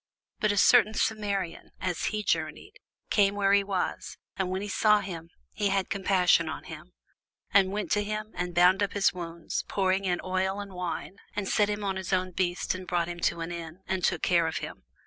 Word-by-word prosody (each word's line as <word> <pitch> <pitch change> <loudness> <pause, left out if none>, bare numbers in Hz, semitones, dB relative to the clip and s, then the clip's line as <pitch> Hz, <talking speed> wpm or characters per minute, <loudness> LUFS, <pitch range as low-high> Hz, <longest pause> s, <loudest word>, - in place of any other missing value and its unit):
But 215 -2 +2
a 205 - -1
certain 220 0 +5
Samaritan, 200 -6 -1
as 180 -2 -2
he 215 -1 -1
journeyed, - - -2 0.3
came 200 -2 +4
where 200 -1 +3
he 200 0 +5
was: 195 -2 -3 0.2
and 190 -1 -1
when 190 +2 -2
he - - -4
saw 210 +1 +4
him, 170 -4 -7 0.2
he 205 -1 0
had 195 -1 0
compassion 185 -4 +3
on - - -6
him, 160 +3 -10 0.6
and 195 -1 +5
went 210 +1 -3
to 210 - +2
him, 215 +1 -4
and 175 0 -4
bound 180 +3 +5
up 200 - 0
his 200 -1 +3
wounds, 170 -2 -4
pouring 195 0 +1
in 180 -1 0
oil 190 +1 -1
and 200 -1 -7
wine, 180 +1 -4 0.2
and 200 -2 -2
set 205 +1 +2
him 205 0 -2
on 195 -1 -1
his 190 0 -5
own 185 0 +1
beast, 175 -1 -1
and 185 0 -7
brought 175 -1 0
him 175 0 -6
to 170 0 0
an 165 +1 -4
inn, 170 +1 -7
and 190 -1 -1
took 175 -4 +1
care 170 -2 +3
of 160 - -2
him. - - -7
190 Hz, 210 wpm, -28 LUFS, 175-200 Hz, 0.6 s, certain